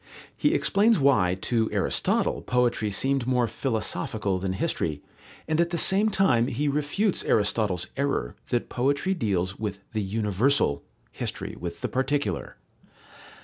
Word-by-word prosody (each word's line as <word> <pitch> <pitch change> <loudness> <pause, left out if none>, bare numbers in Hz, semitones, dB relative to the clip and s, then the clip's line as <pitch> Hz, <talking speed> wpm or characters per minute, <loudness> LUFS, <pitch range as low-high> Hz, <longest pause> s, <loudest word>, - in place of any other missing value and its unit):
He - - +2
explains 210 0 +3
why 105 -11 +3
to 115 -2 +1
Aristotle - - 0
poetry 125 -4 +1
seemed 135 +5 0
more 125 -2 +2
philosophical 110 -5 -2
than 95 0 -2
history, 75 -5 -2 0.4
and 155 +1 +2
at 170 - +1
the 170 - -2
same 200 +6 +3
time 130 - +3
he 140 +3 -1
refutes 150 +8 0
Aristotle's 105 -4 +1
error 140 - -1
that 120 - 0
poetry 140 +9 0
deals 95 - -1
with 100 -2 -4
the 110 - 0
universal, 105 - +1 0.3
history - - -5
with 85 -1 -6
the - - -1
particular. 130 - -1
120 Hz, 135 wpm, -26 LUFS, 100-145 Hz, 0.4 s, explains